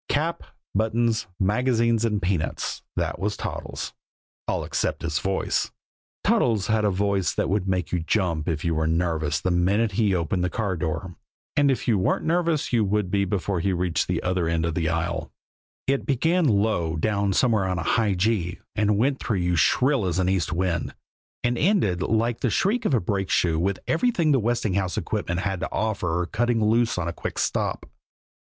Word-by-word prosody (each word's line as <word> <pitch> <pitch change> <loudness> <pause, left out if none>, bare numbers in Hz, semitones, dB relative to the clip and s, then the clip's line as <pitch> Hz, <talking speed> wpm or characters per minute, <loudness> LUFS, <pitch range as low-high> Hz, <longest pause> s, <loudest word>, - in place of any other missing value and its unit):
Cap, 160 +3 0 0.3
buttons, 110 0 +1
magazines 115 +2 +2
and 105 -3 +1
peanuts, 90 -3 -1
that - - -2
was 105 +2 -1
Toddles - - -5 0.5
all - - -1
except - - -2
his 80 -2 0
voice. 95 0 0 0.5
Toddles 110 -5 +2
had 110 -1 +1
a 105 - +3
voice 100 -1 +1
that - - 0
would 95 0 0
make 90 -3 -1
you 90 - +1
jump 85 -2 0
if 80 -1 -2
you 85 - +1
were 80 0 0
nervous 80 -2 0
the 95 - -1
minute 100 +6 +2
he 100 -1 +2
opened 90 +1 -1
the 90 - +1
car 100 -2 -1
door, 90 +2 -3 0.4
and 145 -1 +4
if 135 - -1
you 110 -5 +3
weren't 95 - 0
nervous 165 -4 +1
you 115 -2 +4
would 100 -2 0
be 100 -1 +2
before 95 -1 -1
he 95 - 0
had 90 - 0
reached 90 -2 0
the - - -1
other 90 -2 0
end 85 0 0
of 85 - -1
the 80 -1 0
aisle 85 0 -2 0.5
it 135 0 0
began 165 +6 +2
low 100 -7 +1
down 100 +4 0
somewhere 110 -1 +2
on 90 -1 -1
high 100 +4 +1
G 90 -3 0 0.2
and 105 -1 +2
went 130 +5 +1
through 110 -5 -1
you 90 -1 +1
shrill 125 - +3
as 90 - -1
an 90 -1 +1
east 95 -5 0
wind, 85 -1 -1 0.5
and 120 0 0
ended 150 - +2
like 115 +3 +1
the 125 - +1
shriek 215 - +1
of 140 - +3
a - - +3
brake 95 0 -2
shoe 80 -3 +2
with 95 +2 0
everything 170 -4 +2
the 135 - +4
Westinghouse 105 -5 0
equipment 90 +1 -2
had 95 -2 -2
to - - -4
offer 90 -6 -1
cutting 120 +4 0
loose 115 0 +2
on 85 -2 -1
a 85 - -2
quick - - -5
stop. - - -1
100 Hz, 190 wpm, -25 LUFS, 90-115 Hz, 0.5 s, and